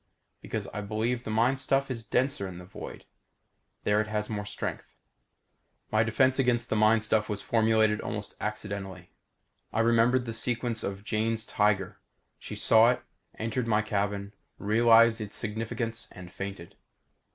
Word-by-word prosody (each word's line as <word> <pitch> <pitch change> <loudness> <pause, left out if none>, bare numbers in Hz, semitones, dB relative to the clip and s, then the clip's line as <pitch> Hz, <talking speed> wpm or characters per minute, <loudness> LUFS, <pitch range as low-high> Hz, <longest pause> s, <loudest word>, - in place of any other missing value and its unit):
Because, - - -4
I 105 - -3
believe, 110 +4 -1
the - - -4
mind 120 +5 +2
stuff 135 0 +1
is 115 -3 -4
denser 125 -1 0
in 90 -2 -8
the 90 - -10
void. 95 - -9 0.8
There 105 +1 +3
it 110 - -4
has 105 0 -2
more 105 -1 -3
strength. 105 - -5 1.0
My 110 - +4
defense 130 +4 +2
against 120 -2 +2
the - - +2
mind 110 +1 +4
stuff 105 0 +1
was 105 -1 -3
formulated 110 -1 +3
almost 105 -1 -5
accidentally. 100 -4 -5 0.6
I 115 - +1
remembered 120 +2 +3
the 115 - -4
sequence 120 0 -1
of 100 0 -4
Jane's 110 +1 -1
tiger. 105 -2 +1 0.4
She - - -7
saw 115 +1 +5
it, 125 - 0 0.3
entered 115 +2 -2
my 105 -1 +2
cabin, 100 -1 -2 0.2
realized 115 +1 +5
its 105 -1 -6
significance, 115 +1 -3
and 90 -1 -11
fainted. 95 -3 -7
110 Hz, 150 wpm, -28 LUFS, 105-115 Hz, 1.0 s, saw